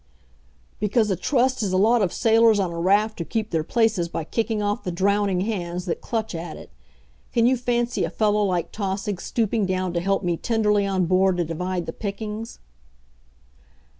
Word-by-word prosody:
"Because 210 +1 +1
a - - +2
Trust 255 - +1
is 200 -3 -1
a 185 - +2
lot 225 +4 +4
of 190 -4 +1
sailors 225 -2 +4
on 185 -3 0
a 170 - -4
raft 205 +5 +2
who - - -1
keep 220 +2 -3
their 160 -2 0
places 210 -2 +1
by 165 - -3
kicking 225 +5 -1
off 205 0 -1
the 180 - -3
drowning 195 +1 +1
hands 180 -4 -3
that 175 - -3
clutch 220 -3 -3
at 170 +1 -6
it. - - -13 0.6
Can 235 -1 +3
you 255 +2 +4
fancy 240 -1 -1
a - - -1
fellow 210 -1 +1
like 180 -4 -1
Tausig 195 -2 -3
stooping 220 -3 0
down 185 -1 -1
to 170 - 0
help 195 +3 0
me 175 -2 0
tenderly 210 -2 +1
on 190 -2 +1
board 185 +1 +3
to 175 - 0
divide 180 +2 -3
the - - -5
pickings?" 215 +2 -5
200 Hz, 190 wpm, -23 LUFS, 180-225 Hz, 0.6 s, lot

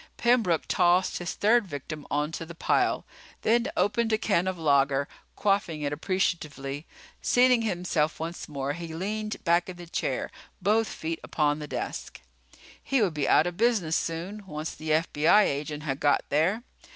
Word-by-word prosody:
Pembroke 230 -9 +3
tossed 180 +1 +3
his 175 +1 -4
third 225 +1 +3
victim 150 0 -7
onto 150 +3 -1
the 165 +1 -10
pile, - - +1 0.4
then 235 +3 +3
opened 225 -1 +1
a 220 - +3
can 190 -4 +1
of 185 -1 -2
lager, 140 -3 +2 0.3
quaffing 195 -7 0
it 145 0 -1
appreciatively. 150 -4 -2 0.3
Seating 250 -1 +4
himself 175 -7 -1
once 165 +1 -5
more, 140 -1 -2
he 165 0 -7
leaned 215 +4 -4
back 170 +1 +2
in 180 - -8
the 175 - -9
chair, 170 - -2 0.3
both 215 +4 +2
feet 165 +1 -4
upon 150 -1 0
the 150 - -6
desk. - - -5 0.6
He 270 - +1
would 195 -7 +2
be 145 -3 -1
out - - +5
of 175 0 -4
business 215 -9 +2
soon, 180 +6 -3
once 155 -1 -5
the 155 0 -7
FBI 160 +5 +4
agent 150 0 -2
had 140 -2 -2
got 145 - +3
there. 175 +11 +1
170 Hz, 165 wpm, -27 LUFS, 150-205 Hz, 0.6 s, out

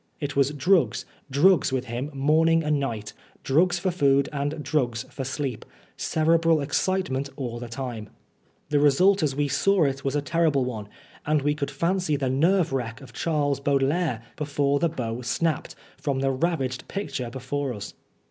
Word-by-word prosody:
It 145 -2 -4
was 140 -1 +3
drugs, 160 +5 +2 0.2
drugs 150 +4 +4
with 130 -1 -1
him 125 +4 -4
morning 160 +4 +3
and 150 -1 +1
night, 110 -6 -4 0.3
drugs 175 +6 +3
for 185 +2 0
food 140 -5 +3
and 145 +2 -2
drugs 125 -7 0
for 135 - -5
sleep; 135 -2 -3 0.3
cerebral 165 0 +2
excitement 145 -2 -1
all 120 -4 -4
the 120 - -6
time. 115 -3 -6 0.6
The 145 - +3
result 180 +8 +4
as 145 -4 0
we 145 0 +1
saw 195 +5 +3
it 135 -1 -1
was 135 +1 -1
a 145 - +1
terrible 150 -3 +2
one, 110 -5 -5 0.3
and 150 -1 +1
we 145 +1 +2
could 145 -2 -3
47 - - -9
Oscar 140 +4 -3
Wilde 185 +2 +2
fancy 155 -5 0
the 135 -2 -1 0.2
nerve 185 -6 +2
wreck 120 -2 -3
of 135 - -13
Charles 145 -4 0
Baudelaire 140 -2 +1
before 145 -1 0
the 170 - +2
bow 120 -5 -4
snapped, 160 +6 -1 0.2
from 135 -2 -2
the 135 0 +2
ravaged 130 -3 -1
picture 145 -11 -4
before 130 +2 -3
us. 105 -3 -7
140 Hz, 175 wpm, -25 LUFS, 130-160 Hz, 0.6 s, drugs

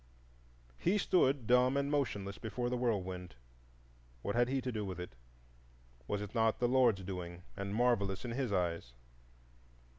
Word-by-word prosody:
He 185 +5 +2
stood 140 - +3
dumb 125 +3 +4
and 140 +1 0
motionless 105 -9 -1
before 120 +2 -2
the - - +1
whirlwind: 95 - -2 0.9
what 100 - -1
had 120 0 +3
he 135 +1 0
to 125 0 -3
do 110 -3 -2
with 95 -3 -5
it? 90 - -6 0.9
Was 105 0 -1
it 105 - -8
not 115 -2 +2
the 120 - +2
Lord's 120 -6 +4
doing, 90 -2 -6
and 100 +1 -3
marvellous 110 -4 +1
in 120 - -3
his 125 -2 -1
eyes? 85 -9 -1
110 Hz, 155 wpm, -34 LUFS, 95-125 Hz, 0.9 s, dumb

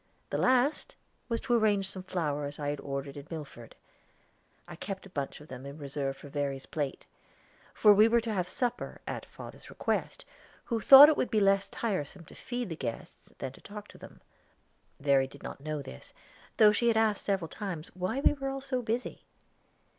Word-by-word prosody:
The - - 0
last 260 +3 +2 0.3
was 230 -1 0
to 250 - -1
arrange 210 -4 +3
some 190 -1 -4
flowers 150 -6 -3
I 145 -1 -2
had 145 0 -3
ordered 140 0 -5
in 140 +1 -9
Milford. 145 -8 -9 0.9
I - - -9
kept 195 -1 -6
a 195 - -13
bunch 140 -5 -4
of 150 - -13
them 130 -2 -9
in 140 +1 -8
reserve 140 -2 -4
for - - -11
Verry's 140 -1 -3
plate; 145 -4 -4 0.7
for 210 - +7
we 210 +2 +6
were 235 +1 +4
to 225 -1 -3
have 180 -3 -1
a - - -5
supper, 245 +3 -3
at - - -5
father's - - -11
request, - - -2 0.4
who 230 -3 -2
thought 275 +7 +11
it 310 - +3
would - - 0
be 220 - +2
less 195 0 +3
tiresome 185 -5 -3
to - - -15
feed 245 -3 -5
the 165 - -4
guests 120 -6 -7
than 130 - -5
to - - -17
talk 210 0 -9
to - - -14
them. - - -13 0.8
Verry 140 -2 +3
did 140 +1 -15
not - - -7
know 150 -1 -4
this, 65 - -11 0.4
though 215 -1 +8
she 235 +3 +1
had 230 -1 +3
asked 220 -2 +1
several 195 -5 0
times 175 -4 -6
why 185 +9 -2
we - - +5
were 275 -2 -4
all 270 0 -3
so 265 -2 -2
busy. 235 +2 -3
185 Hz, 200 wpm, -30 LUFS, 145-225 Hz, 0.9 s, thought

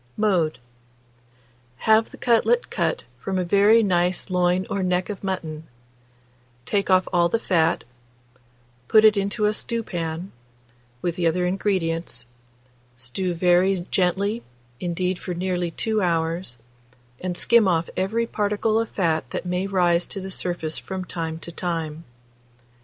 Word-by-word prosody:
Mode. 185 -7 +2 1.2
Have 220 +7 +3
the - - -12
cutlet 250 - +2
cut - - 0 0.2
from 190 -1 -2
a 185 - +1
very 205 +5 +5
nice 180 -1 +1
loin 180 +1 +2
or 200 - -2
neck 180 +1 0
of 200 - -8
mutton; 160 -5 -4 1.0
take 200 +8 0
off 185 0 +4
all 170 -1 +4
the 230 - +2
fat; 170 -6 +1 1.0
put 220 0 +6
it 215 0 +7
into 200 +2 0
a 210 - +3
stewpan, 175 -7 -4 0.7
with 175 0 -1
the 175 -2 +2
other 180 +2 +1
ingredients; 175 - -1 0.7
stew 170 +9 -3
very 180 +2 +4 0.2
gently 200 +5 +1 0.4
indeed 180 +2 -1
for 180 - -5
nearly 180 -1 -1
2 215 +5 -1
hours, 165 -5 -1 0.6
and 180 -1 -3
skim 235 0 +4
off 170 -2 +1
every 215 +5 0
particle 215 0 0
of 230 - -1
fat 160 -8 0
that - - -4
may 180 +2 -1
rise 175 -3 +2
to 200 - -5
the 190 0 -6
surface 175 -4 -2
from 190 -1 -5
time 165 -2 -4
to 170 +1 -8
time. 165 -2 -3
180 Hz, 140 wpm, -24 LUFS, 170-200 Hz, 1.2 s, it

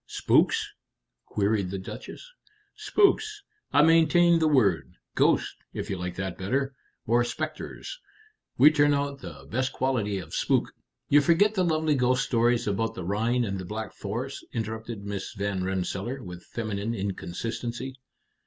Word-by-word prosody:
"Spooks?" - - +2 0.6
queried 100 -2 0
the 95 - -3
Duchess. 110 - -8 0.5
"Spooks. 420 0 +2 0.3
I 145 +1 +5
maintain 165 +1 +5
the 160 - +3
word. 100 - +2 0.2
Ghost, - - +2 0.2
if - - -4
you 95 - -2
like 90 -1 -4
that 95 -2 -4
better, 135 +8 -1 0.3
or 120 +2 +3
specters. 155 - -5 0.6
We 145 +5 +8
turn 145 -1 +4
out 140 0 -2
the - - -10
best 130 +2 0
quality 115 -7 0
of 95 - -8
spook - - +1 0.2
" - - -56
"You 145 +1 +7
forget 175 +8 +4
the 185 -3 +1
lovely 160 -2 +2
ghost 125 -2 +2
stories 120 0 +2
about 110 +2 -1
the 90 - -5
Rhine 115 +6 +1
and 100 -2 -3
the - - -5
Black 110 +3 -5
Forest," 120 +7 -5
interrupted 110 -2 -4
Miss 100 -1 -5
Van 100 -2 -2
Rensselaer, 95 +7 -3
with 90 -1 -9
feminine 110 0 -3
inconsistency. 115 +6 -4
120 Hz, 150 wpm, -27 LUFS, 100-145 Hz, 0.6 s, We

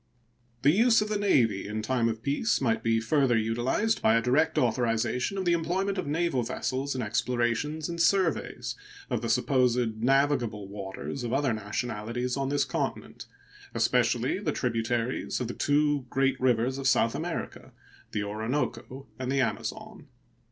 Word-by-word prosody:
The 140 - +6
use 225 +4 +4
of 210 - -6
the 210 -1 -1
Navy 115 - +2
in 110 +1 -4
time 120 0 +1
of 110 0 -5
peace 145 - +1
might 115 -4 +1
be 115 0 +2
further 125 +1 +2
utilized 120 - 0
by 110 - +4
a 115 - +3
direct 140 +6 +2
authorization 120 - 0
of 190 - -2
the 175 - +3
employment 185 +4 -1
of 185 - -3
naval 155 -3 0
vessels 130 +4 -2
in 125 - -2
explorations 120 +7 -1
and 170 -1 -3
surveys 180 0 +1 0.4
of - - 0
the 115 - -3
supposed 125 -2 +1
navigable 125 -6 +1
waters 100 +6 -6
of 120 - -3
other 135 -3 +1
nationalities 115 +3 -3
on 135 -1 -1
this 145 0 +1
continent, - - -4 0.5
especially - - +1
the - - -1
tributaries 115 +2 -1
of 125 - -2
the 120 - -4
two 145 -2 +1
great 135 0 +1
rivers 130 +1 +1
of 135 - -1
South 115 -2 +3
America, - - -5 0.4
the 105 - -1
Orinoco 120 +4 -3
and 130 0 -2
the 135 0 +2
Amazon. 125 - -4
125 Hz, 160 wpm, -28 LUFS, 115-145 Hz, 0.5 s, The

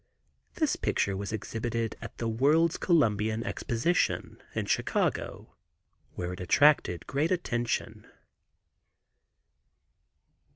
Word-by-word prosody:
This 310 -4 +1
picture 100 - 0
was 100 +2 -4
exhibited 115 +1 -3
at 115 - -9
the 115 - -2
World's 150 +9 +3
Columbian 110 - +2
Exposition, 130 +9 -1
in - - -1
Chicago, - - -1 0.6
where 90 0 -3
it - - -8
attracted 115 - +3
great 145 +4 0
attention. 120 -10 -2
115 Hz, 90 wpm, -29 LUFS, 110-150 Hz, 0.6 s, World's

